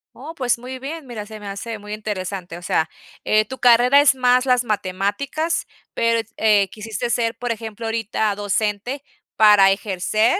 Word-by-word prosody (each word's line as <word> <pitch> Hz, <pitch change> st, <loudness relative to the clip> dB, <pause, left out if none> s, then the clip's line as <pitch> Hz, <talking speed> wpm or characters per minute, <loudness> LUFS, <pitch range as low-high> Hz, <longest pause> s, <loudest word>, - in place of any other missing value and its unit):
Oh, 310 Hz, +6 st, -9 dB
pues 245 Hz, -3 st, 0 dB
muy 255 Hz, +1 st, -7 dB
bien. 280 Hz, +2 st, -7 dB
Mira, 215 Hz, -4 st, -6 dB
se 215 Hz, 0 st, -10 dB
me 205 Hz, -, -9 dB
hace 210 Hz, +2 st, -5 dB
muy 210 Hz, +1 st, -8 dB
interesante, 190 Hz, -4 st, -5 dB
o -, -, -15 dB
sea, 160 Hz, -2 st, 0 dB, 0.4 s
eh, 215 Hz, 0 st, +3 dB
tu 260 Hz, +4 st, -8 dB
carrera 245 Hz, +3 st, +6 dB
es 285 Hz, -1 st, +6 dB
más 250 Hz, 0 st, +3 dB
las 250 Hz, -1 st, +3 dB
matemáticas, 210 Hz, -, -2 dB, 0.3 s
pero 230 Hz, 0 st, +2 dB, 0.2 s
eh, 210 Hz, -3 st, +4 dB
quisiste 220 Hz, +3 st, -5 dB
ser, 230 Hz, 0 st, 0 dB
por 245 Hz, 0 st, -3 dB
ejemplo, 225 Hz, 0 st, -5 dB
ahorita 220 Hz, -1 st, -1 dB
docente 210 Hz, +6 st, -2 dB, 0.3 s
para 205 Hz, -3 st, +7 dB
ejercer, 215 Hz, -, +1 dB
220 Hz, 165 wpm, -21 LUFS, 205-250 Hz, 0.4 s, para